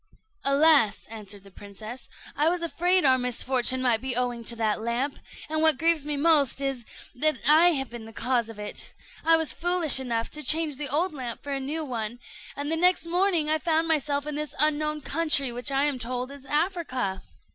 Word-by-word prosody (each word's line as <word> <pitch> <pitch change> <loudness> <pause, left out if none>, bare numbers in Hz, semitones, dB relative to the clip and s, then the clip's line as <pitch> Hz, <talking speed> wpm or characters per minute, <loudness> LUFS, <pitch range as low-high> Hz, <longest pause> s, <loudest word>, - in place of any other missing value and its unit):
"Alas!" 275 -6 +3
answered 205 -3 -7
the 195 - -16
princess, 215 +6 -10 0.3
"I 300 +3 +2
was 350 0 -1
afraid 355 +1 +1
our 260 -1 +4
misfortune 250 +1 0
might 235 -3 +2
be 260 -2 -3
owing 245 -1 -2
to 235 - +2
that 220 -2 -1
lamp; 240 +5 -2 0.3
and 310 0 -1
what 315 -3 +5
grieves 325 -3 +2
me 295 -1 -3
most 290 -4 +2
is, 270 -4 -3 0.3
that 305 +2 +2
I 330 +4 +6
have 270 -4 -3
been 235 -2 -8
the 225 - -11
cause 235 0 -1
of 225 - -10
it. 210 0 -7 0.3
I 325 +1 +5
was 320 -4 -1
foolish 350 -5 +3
enough 235 -3 -3
to 300 - -5
change 310 -2 +2
the 290 -1 -4
old 315 +6 0
lamp 250 -5 -6
for 285 - -6
a 275 - -1
new 300 +4 -4
one, 235 -3 -4 0.4
and 290 +2 -4
the 325 - +2
next 360 +1 +2
morning 350 -2 +1
I 310 +1 +2
found 325 0 0
myself 290 -2 0
in 300 - -4
this 300 0 -4
unknown 300 +1 +1
country, 290 -4 +1
which 245 +4 -2
I 275 +1 +1
am 290 -3 -1
told 250 +2 -4
is 280 -1 -12
Africa." 295 - -2
280 Hz, 200 wpm, -26 LUFS, 245-315 Hz, 0.4 s, I